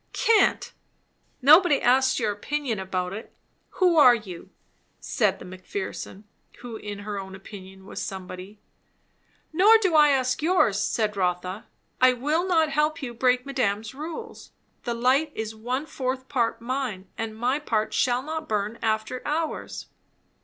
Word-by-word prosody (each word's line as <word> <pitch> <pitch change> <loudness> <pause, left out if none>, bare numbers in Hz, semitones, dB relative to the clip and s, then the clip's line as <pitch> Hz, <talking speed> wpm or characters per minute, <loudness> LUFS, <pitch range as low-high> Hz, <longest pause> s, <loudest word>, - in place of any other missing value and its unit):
"Cant!" 445 -3 +2 0.7
"Nobody 305 +1 +7
asks 260 +1 +3
your 220 -3 0
opinion 240 +2 -3
about 185 -1 -3
it. 215 - -8 0.5
Who 360 -3 +3
are 255 -5 +8
you?" 190 -7 -9 0.5
said - - 0
the - - -11
Mc 185 0 -11
Pherson, 195 +1 -6 0.4
who 240 -2 -7
in 205 -2 -6
her 205 -1 -4
own 190 0 -8
opinion 190 -1 -12
was - - -6
somebody. 190 +2 -7 0.9
"Nor 410 +7 +7
do 380 -6 0
I 300 -1 +7
ask 255 -1 +1
yours," 310 - +3
said 215 -1 0
Rotha. 180 +1 -2 0.3
"I 255 0 +6
will 300 +8 0
not 325 -4 +3
help 300 +2 0
you 240 -2 -4
break 250 +1 +2
madame's 225 -5 -1
rules. 330 - -8 0.4
The 240 -1 -2
light 265 +6 +2
is 220 0 -4
one 250 +6 -3
fourth 260 -3 -4
part 235 -4 0
mine; 235 -6 -3
and 220 -1 -5
my 250 +5 0
part 220 -7 -1
shall 250 0 +1
not 315 +1 -5
burn 210 +2 -2
after 220 +3 -1
hours." 315 +2 -3
245 Hz, 150 wpm, -25 LUFS, 205-295 Hz, 0.9 s, are